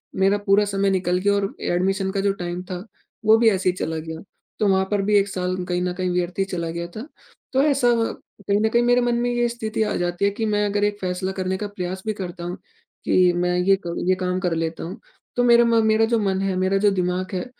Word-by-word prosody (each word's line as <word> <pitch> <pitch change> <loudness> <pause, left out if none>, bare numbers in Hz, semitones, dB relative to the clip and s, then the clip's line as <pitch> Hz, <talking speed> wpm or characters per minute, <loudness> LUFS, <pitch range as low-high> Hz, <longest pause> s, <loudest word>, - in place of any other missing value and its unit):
मेरा 195 +2 +3
पूरा 200 +1 +4
समय 200 -1 0
निकल 180 -1 +1
गया 200 +2 +2
और 200 0 -1
एडमिशन 190 +2 0
का 195 - -2
जो 200 0 +2
टाइम 175 -1 -5
था, 185 +1 -7 0.4
वो 220 +1 +7
भी 225 0 +5
ऐसी 185 -3 +1
चला 165 -3 -3
गया, 160 0 -6 0.4
तो 210 - +2
वहाँ 190 -1 +3
पर 205 -1 +2
भी 205 +1 +1
1 200 0 +3
साल 185 -2 -2
कहीं 180 -1 -1
न 180 0 -1
कहीं 185 0 -2
व्यर्थ 180 +1 -2
ही 195 - +2
चला 170 -3 -4
गया 170 +1 -4
था। 225 +6 -6 0.5
तो 265 - +4
ऐसा 275 -4 +3 0.6
कहीं 200 0 +2
न 220 - +2
कहीं 235 +2 +3
मेरे 245 +1 +4
मन 240 -1 +1
में 245 0 0
ये 240 0 +1
स्थिति 220 -2 -2
आ 215 - -1
जाती 175 +2 -1
है 200 - +2
कि 220 +2 -3
मैं 210 -1 +1
अगर 205 0 0
एक 205 0 0
फैसला 185 0 -2
करने 190 0 -2
का 210 - -4
प्रयास 185 -2 -5
भी 215 - -1
करता 180 -3 -7
हूँ, 175 +1 -5 0.5
कि 180 -1 +4
मैं 180 0 0
ये 190 +2 +4
क 170 - -3 0.2
ये 185 - +4
काम 185 0 -2
कर 180 -2 -1
लेता 165 0 -3
हूँ, 185 +7 -7 0.4
तो 245 - +2
मेरा 235 -1 +6
म 230 -1 +3
मेरा 220 +1 +4
जो 230 0 +1
मन 195 -2 0
है, 195 -1 -1
मेरा 185 +1 +1
जो 205 +1 +4
दिमाग 180 0 -1
है, 180 -1 -2
195 Hz, 250 wpm, -22 LUFS, 180-210 Hz, 0.6 s, वो